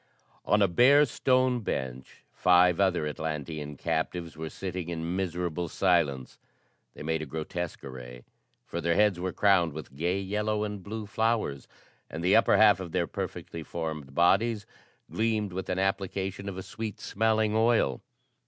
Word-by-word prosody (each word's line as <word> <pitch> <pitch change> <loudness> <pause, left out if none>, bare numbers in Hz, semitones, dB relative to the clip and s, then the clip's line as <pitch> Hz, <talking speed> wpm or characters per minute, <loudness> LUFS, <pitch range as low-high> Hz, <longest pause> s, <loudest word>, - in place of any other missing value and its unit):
On 105 0 +4
a - - +5
bare 135 +11 +6
stone 130 -1 +2
bench, 65 - -5
five 90 0 +4
other 95 -5 +2
Atlantean 75 -1 -4
captives 85 +2 -2
were 80 0 -5
sitting 90 -2 -5
in 85 +1 -3
miserable 90 -2 -2
silence. 80 -10 +1 0.6
They - - -8
made 80 +1 -1
a 80 - -5
grotesque 80 +3 -5
array, 60 -2 -9 0.4
for 85 - -4
their 85 0 +1
heads 105 -3 +3
were 95 +1 -2
crowned 90 -6 +3
with 75 -3 -9
gay 90 +6 0
yellow 105 +2 -1
and 105 -2 -4
blue 110 +3 -6
flowers, 110 -9 -1 0.4
and 80 +2 -6
the 90 - +4
upper 115 - +5
half 105 -3 +6
of 90 -3 -7
their 90 -2 +1
perfectly 85 0 -6
formed 75 -4 -5
bodies 105 +5 +3 0.5
gleamed 110 -3 0
with 95 +1 -5
an 90 - -1
application 95 0 -2
of 95 - -7
a 95 - -5
sweet 110 0 -6
smelling 110 0 +1
oil. 110 - +2
90 Hz, 155 wpm, -28 LUFS, 80-105 Hz, 0.6 s, bare